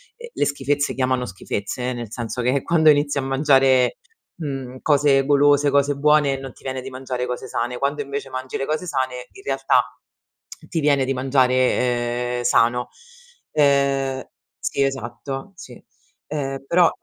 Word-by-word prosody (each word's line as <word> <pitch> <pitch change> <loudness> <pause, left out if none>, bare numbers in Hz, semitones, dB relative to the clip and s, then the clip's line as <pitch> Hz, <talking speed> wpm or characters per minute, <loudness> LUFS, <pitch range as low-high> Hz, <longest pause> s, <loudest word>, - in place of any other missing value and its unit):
uhm, 475 0 -10
le - - 0
schifezze 145 0 0
chiamano 130 -1 0
schifezze, 105 +5 -4
eh, - - -2
nel 120 -3 -7
senso 120 +1 -4
che 125 +2 +1
quando 160 -2 +4
inizi 145 -1 +3
a - - +1
mangiare, 135 -1 +3 0.4
mhmm, 135 -5 -5
cose 140 -2 +3
golose, 145 0 +4
cose 140 0 +2
buone 145 -1 +3
non 135 -2 -8
ti - - -21
viene 130 -1 -3
di 130 - -7
mangiare 130 -1 -4
cose 125 0 -5
sane; 120 +1 -2
quando, 140 +3 -1
invece, 140 -1 -5
mangi 130 0 -6
le 135 - -1
cose 155 +5 -2
sane, 130 -4 -2
in 395 - -14
realtà, - - +2 0.9
ti 165 - -1
viene 145 -3 +3
di 135 +1 -1
mangiare, 125 -2 +1
ehm, 120 - -3
sano. 120 0 +2 0.6
Ehm 140 -2 +2 0.4
sì 140 - -2
esatto, 135 +3 -4
sì. - - -11 0.5
Ehm, 135 -3 -4
però 170 +3 +4
135 Hz, 160 wpm, -22 LUFS, 125-145 Hz, 0.9 s, quando